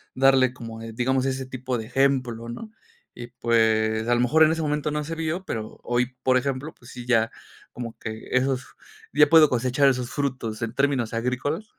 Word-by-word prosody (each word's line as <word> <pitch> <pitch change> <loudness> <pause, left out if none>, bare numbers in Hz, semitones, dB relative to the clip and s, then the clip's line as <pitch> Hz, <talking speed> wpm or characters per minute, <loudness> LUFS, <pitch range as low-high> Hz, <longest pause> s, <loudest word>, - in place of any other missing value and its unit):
darle 130 -1 +4
como, 115 -3 -9
digamos, 125 +4 -1
ese 130 0 -2
tipo 130 -1 -4
de 110 - -5
ejemplo, 125 -3 0
¿no?, 215 - -8 0.5
y, 120 - -6
pues, 110 -1 +2
a 120 - +3
lo 120 - +2
mejor 155 +6 +4
en 155 - +5
ese 165 0 -1
momento 150 -1 -1
no 150 0 -2
se 165 +2 -5
vio, 165 +3 -3
pero 110 - -6
hoy, 125 +1 -1
por 130 -1 +4
ejemplo, 135 +3 -2
pues 120 0 -15
sí, 125 -1 -9
ya 115 -2 +2 0.4
como 120 -2 -7
que 110 0 -7
esos, 130 0 +1 0.5
ya 150 0 +5
puedo 160 -1 +7
cosechar 130 +3 +2
esos 125 -2 -2
frutos 125 -6 -3
en 115 -1 -3
términos 135 -5 0
agrícolas, 130 - -2
130 Hz, 190 wpm, -24 LUFS, 120-140 Hz, 0.5 s, puedo